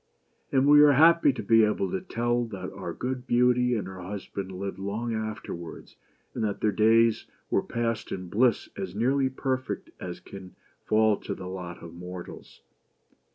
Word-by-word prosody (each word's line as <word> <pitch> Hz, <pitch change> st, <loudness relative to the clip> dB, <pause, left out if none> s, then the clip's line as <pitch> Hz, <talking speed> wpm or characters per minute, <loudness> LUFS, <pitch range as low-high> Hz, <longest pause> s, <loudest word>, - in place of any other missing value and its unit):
And 135 Hz, +1 st, +3 dB
we 145 Hz, 0 st, +8 dB
are 150 Hz, -1 st, +7 dB
happy 165 Hz, +1 st, +6 dB
to 120 Hz, -4 st, -6 dB
be 115 Hz, +2 st, +5 dB
able 105 Hz, -2 st, 0 dB
to 190 Hz, -, -2 dB
tell 120 Hz, -7 st, -1 dB
that 100 Hz, -5 st, -7 dB
our -, -, -6 dB
good 130 Hz, 0 st, -4 dB
Beauty 125 Hz, 0 st, +3 dB
and 100 Hz, -5 st, -3 dB
her 95 Hz, -1 st, -8 dB
husband 95 Hz, 0 st, -6 dB
lived 95 Hz, 0 st, -5 dB
long 105 Hz, +4 st, -3 dB
afterwards, 110 Hz, -6 st, -6 dB, 0.4 s
and -, -, -3 dB
that 105 Hz, -2 st, -1 dB
their 105 Hz, -, +2 dB
days 110 Hz, +2 st, +3 dB, 0.2 s
were -, -, +3 dB
passed 115 Hz, -1 st, -3 dB
in 95 Hz, -1 st, -5 dB
bliss 115 Hz, +5 st, +2 dB
as 95 Hz, -2 st, -5 dB
nearly 130 Hz, +4 st, +2 dB
perfect 130 Hz, 0 st, -3 dB
as 90 Hz, -1 st, -6 dB
can 95 Hz, 0 st, -11 dB, 0.3 s
fall 110 Hz, -1 st, +3 dB
to -, -, -5 dB
the 95 Hz, -, -8 dB
lot 90 Hz, -2 st, -7 dB
of 85 Hz, -1 st, -9 dB
mortals. 90 Hz, +1 st, -10 dB
110 Hz, 170 wpm, -27 LUFS, 95-125 Hz, 0.4 s, we